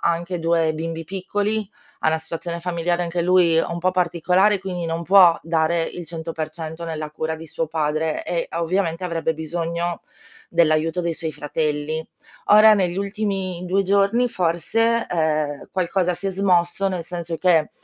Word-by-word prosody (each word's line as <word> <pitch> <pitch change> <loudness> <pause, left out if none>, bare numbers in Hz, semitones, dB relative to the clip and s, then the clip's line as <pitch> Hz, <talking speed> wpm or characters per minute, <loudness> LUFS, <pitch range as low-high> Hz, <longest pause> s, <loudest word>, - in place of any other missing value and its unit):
anche 170 +1 -3
2 165 -1 +2
bimbi 165 +1 -4
piccoli, 205 +3 -2 0.3
ha - - +3
una 160 - +2
situazione 170 +1 -5
familiare 175 0 -1
anche 170 0 -2
lui 175 -2 +4
un 170 +1 -1
po' 185 +2 +1
particolare, 180 +3 +2
quindi 180 -3 -4
non 165 +1 -2
può 180 -2 +6
dare 165 0 +1
il 170 +1 -6
100% 160 0 -5
nella 155 -2 -5
cura 160 +1 -3
di 160 +1 -10
suo 165 +1 -3
padre 155 0 -1
e, 170 -1 -2
ovviamente, 170 0 -1
avrebbe 165 -2 -1
bisogno 170 +2 -3 0.5
dell'aiuto 165 0 +2
dei 170 -1 -1
suoi 160 -1 -4
fratelli. 150 +1 -2 0.4
Ora 215 +1 +8
negli 185 -3 0
ultimi 195 -3 -2
2 190 +2 +2
giorni 200 +5 +2
forse, 225 +6 +1
uhm, 155 -3 -1
qualcosa 180 -1 0
si 180 +3 -5
è - - -1
smosso, 185 0 +1
nel 180 -3 -4
senso 170 -1 -5
che, 165 -3 +3
170 Hz, 155 wpm, -22 LUFS, 160-185 Hz, 0.5 s, Ora